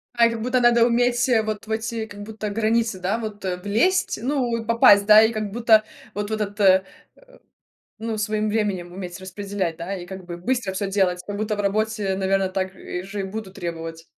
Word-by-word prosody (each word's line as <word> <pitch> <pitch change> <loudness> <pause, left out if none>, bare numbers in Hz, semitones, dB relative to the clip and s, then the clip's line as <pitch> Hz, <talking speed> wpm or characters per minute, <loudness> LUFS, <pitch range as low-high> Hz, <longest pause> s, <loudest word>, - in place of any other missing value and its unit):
Как 230 -1 +3
будто 250 +2 +1
надо 240 -1 +5
уметь 245 +1 +2
вот 215 0 -4
в 220 - -7
эти, 225 0 -2
как 205 0 -9
будто, 215 0 -5
границы, 225 -1 0
да, 190 +5 -1
вот 215 -3 -6 0.2
влезть, 345 - +1
ну, 250 -3 0
от 225 - -8
попасть, 205 -3 +6
да, 215 +1 +8
и 220 - +3
как 215 -3 -3
будто, 225 -1 +4 0.3
вот 205 0 -3
в - - -3
этот, 210 -1 -3
э 190 -2 +5 1.2
Ну, 220 0 -3
своим 215 0 -1
временем 200 -5 -1
уметь 180 -1 -7
распределять, 190 -2 -4
да, 175 +4 -5
и, 175 -1 -8
как 190 0 -8
бы, 175 -1 -6
быстро 205 +2 -2
всё 195 0 -2
делать, 190 -3 +1
как 205 - -4
будто 215 +1 -1
в - - -2
работе, 205 -1 0
наверно, 195 0 +1
так 190 0 -3
и 180 - -6
же 195 +2 -6
и - - -1
буду 195 0 -6
требовать. 165 -3 -6
210 Hz, 200 wpm, -23 LUFS, 190-225 Hz, 1.2 s, да